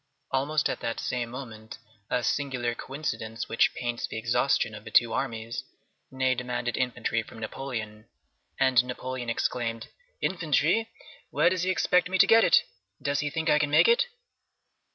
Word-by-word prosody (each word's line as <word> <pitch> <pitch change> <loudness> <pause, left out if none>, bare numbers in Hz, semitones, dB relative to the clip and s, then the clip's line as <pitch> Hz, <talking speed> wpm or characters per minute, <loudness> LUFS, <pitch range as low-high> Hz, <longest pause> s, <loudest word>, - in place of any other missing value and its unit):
Almost 145 +3 +1
at - - -3
that 115 - -3
same 120 -2 -2
moment, 115 -4 -8 0.3
a 125 - 0
singular 125 -2 -1
coincidence 115 -5 -5
which 115 - +3
paints 120 -1 -3
the - - -6
exhaustion 120 0 +1
of 105 0 -9
the 110 - -8
two 115 +1 +4
armies, 115 0 -3 0.5
Ney 130 0 +1
demanded 125 -2 -3
infantry 120 -2 -1
from 115 - -13
Napoleon, 110 -2 -6 0.5
and 130 -2 +5
Napoleon 125 0 -5
exclaimed, 115 0 -2 0.3
"Infantry! 170 +5 +1 0.4
Where 175 - +3
does 185 -2 0
he 185 - 0
expect 180 -1 +2
me 190 - +1
to - - +7
get 225 0 +6
it? - - +5 0.4
Does 140 -1 -1
he 150 - -1
think 160 +2 -3
I 150 - +5
can 150 -1 +1
make 145 - +6
it?" 475 +1 +4
125 Hz, 160 wpm, -27 LUFS, 115-145 Hz, 0.5 s, to